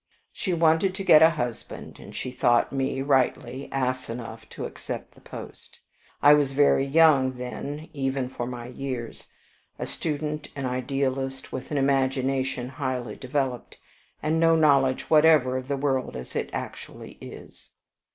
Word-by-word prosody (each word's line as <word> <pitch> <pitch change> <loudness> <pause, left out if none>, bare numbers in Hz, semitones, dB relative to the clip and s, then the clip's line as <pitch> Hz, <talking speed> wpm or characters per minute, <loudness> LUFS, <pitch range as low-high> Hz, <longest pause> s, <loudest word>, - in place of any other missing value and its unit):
She 190 - -3
wanted 170 +3 +3
to 195 - -4
get 155 -5 +7
a 160 - +8
husband, 120 -8 -5
and - - -12
she 130 - -4
thought 120 -1 +2
me 135 0 -1
rightly 130 -1 0
ass 130 -2 -1
enough 115 0 -7
to - - -6
accept - - -7
the - - -20
post. - - -11 0.4
I 145 +1 +9
was 145 -2 +2
very 140 -1 +4
young 140 -2 +4
then 140 +5 -6
even 135 -2 -1
for 120 -1 -5
my 120 -1 -6
years, 125 -1 -6 0.5
a - - -4
student, 150 -1 -3
an 140 -2 -4
idealist, 135 +1 -2
with 130 - -6
an 150 - -2
imagination 135 -1 0
highly 130 -4 -4
developed, 130 -2 -3 0.5
and 160 +1 +1
no 165 0 +5
knowledge 140 -4 +3
whatever 150 -5 +5
of 130 0 -4
the 140 0 -1
world 135 -2 -1
as 65 0 -7
it - - -2
actually - - -8
is. - - -12
135 Hz, 150 wpm, -26 LUFS, 130-145 Hz, 0.5 s, I